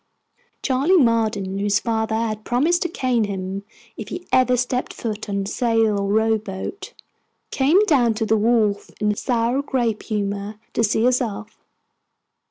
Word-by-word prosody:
Charley 280 Hz, +8 st, +3 dB
Marden, 220 Hz, -, +1 dB
whose 205 Hz, 0 st, +2 dB
father 220 Hz, -1 st, -1 dB
had 220 Hz, -1 st, -2 dB
promised 310 Hz, +10 st, +1 dB
to 350 Hz, -, 0 dB
cane 250 Hz, -7 st, 0 dB
him 195 Hz, -1 st, -4 dB, 0.4 s
if 215 Hz, -, -6 dB
he 360 Hz, -, -6 dB
ever 255 Hz, -1 st, +4 dB
stepped 250 Hz, +1 st, -2 dB
foot 215 Hz, -2 st, -5 dB
on 200 Hz, -1 st, -1 dB
sail 225 Hz, -1 st, +1 dB
or 200 Hz, 0 st, -1 dB
rowboat, 220 Hz, -, -1 dB, 0.6 s
came 280 Hz, +6 st, +3 dB
down 245 Hz, -, +3 dB
to 220 Hz, 0 st, -1 dB
the 220 Hz, -, +2 dB
wharf 215 Hz, -2 st, +1 dB
in 210 Hz, 0 st, +1 dB
a -, -, -2 dB
sour 240 Hz, +4 st, 0 dB
grape 240 Hz, -6 st, -1 dB
humor, 205 Hz, -1 st, -3 dB
to 230 Hz, -, +1 dB
see 220 Hz, +1 st, +2 dB
us 250 Hz, 0 st, +3 dB
off. 215 Hz, -2 st, -5 dB
225 Hz, 155 wpm, -22 LUFS, 210-250 Hz, 0.6 s, ever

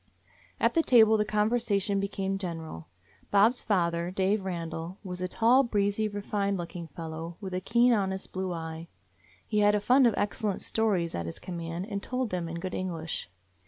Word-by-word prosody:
At -, -, +3 dB
the 330 Hz, -, +4 dB
table 220 Hz, -7 st, +6 dB
the 210 Hz, -1 st, +2 dB
conversation 210 Hz, -2 st, +1 dB
became 195 Hz, 0 st, -2 dB
gen 175 Hz, -4 st, -3 dB
eral. 155 Hz, -, -8 dB, 0.4 s
Bob's 215 Hz, +5 st, +4 dB
father, 170 Hz, -4 st, +1 dB
Dave 190 Hz, +2 st, +1 dB
Randall, 170 Hz, -1 st, -4 dB
was 180 Hz, -2 st, -6 dB
a 185 Hz, -, 0 dB
tall, 235 Hz, +7 st, +4 dB
breezy, 210 Hz, -3 st, +1 dB
refined 205 Hz, -1 st, -1 dB
looking 170 Hz, -1 st, -6 dB
fellow, 165 Hz, +2 st, -7 dB
with 190 Hz, -2 st, -6 dB
a 185 Hz, -, -1 dB
keen, 235 Hz, +5 st, +4 dB
honest 190 Hz, -3 st, -1 dB
blue 185 Hz, -1 st, -3 dB
eye. 165 Hz, -1 st, -5 dB, 0.6 s
He 210 Hz, -, 0 dB
had 205 Hz, 0 st, +5 dB
a -, -, +2 dB
fund 250 Hz, +5 st, +5 dB
of 225 Hz, -, +1 dB
excellent 205 Hz, 0 st, -1 dB
stories 195 Hz, -7 st, 0 dB
at 85 Hz, -1 st, -3 dB
his 85 Hz, -, -6 dB
command 170 Hz, 0 st, -5 dB
and 200 Hz, -2 st, -3 dB
told 250 Hz, +1 st, -2 dB
them 175 Hz, -2 st, -2 dB
in 170 Hz, +1 st, -5 dB
good 185 Hz, +1 st, -5 dB
English. 165 Hz, -, -4 dB
195 Hz, 180 wpm, -29 LUFS, 170-210 Hz, 0.6 s, table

